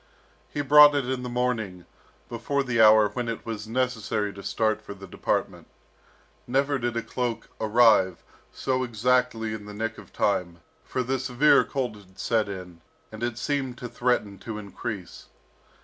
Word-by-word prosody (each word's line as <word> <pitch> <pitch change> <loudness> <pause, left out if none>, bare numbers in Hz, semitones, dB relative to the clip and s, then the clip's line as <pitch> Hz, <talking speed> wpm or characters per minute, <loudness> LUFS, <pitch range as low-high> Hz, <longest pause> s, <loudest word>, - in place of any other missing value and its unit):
He 145 - -3
brought 145 +1 +8
it 140 -3 0
in 130 -1 -2
the 125 - -5
morning, 115 -8 -2 0.4
before 130 +5 -2
the 125 -3 +1
hour 110 -1 +7
when 120 +3 -4
it 115 - -5
was 110 -2 -5
necessary 110 -4 -1
to 100 - -10
start 110 +2 0
for 100 - -9
the 95 0 -11
department. 95 - -2 0.8
Never 140 +2 +1
did 120 -1 -2
a 115 - -1
cloak 120 -3 -3
arrive 110 -5 +4 0.3
so 130 -1 -1
exactly 120 -1 0
in 105 -1 -7
the 105 - -9
nick 110 +1 -3
of - - -14
time, 85 -4 -1 0.2
for 130 - -2
the 130 +2 -1
severe 130 +3 +4
cold 125 -6 -3
had 95 -2 -19
set 110 -3 0
in, 90 -3 -8 0.3
and 110 +1 -9
it 120 -1 -2
seemed 135 -3 -2
to 125 - -6
threaten 120 -5 -1
to 110 0 -6
increase. 100 -2 -7
115 Hz, 165 wpm, -26 LUFS, 105-125 Hz, 0.8 s, brought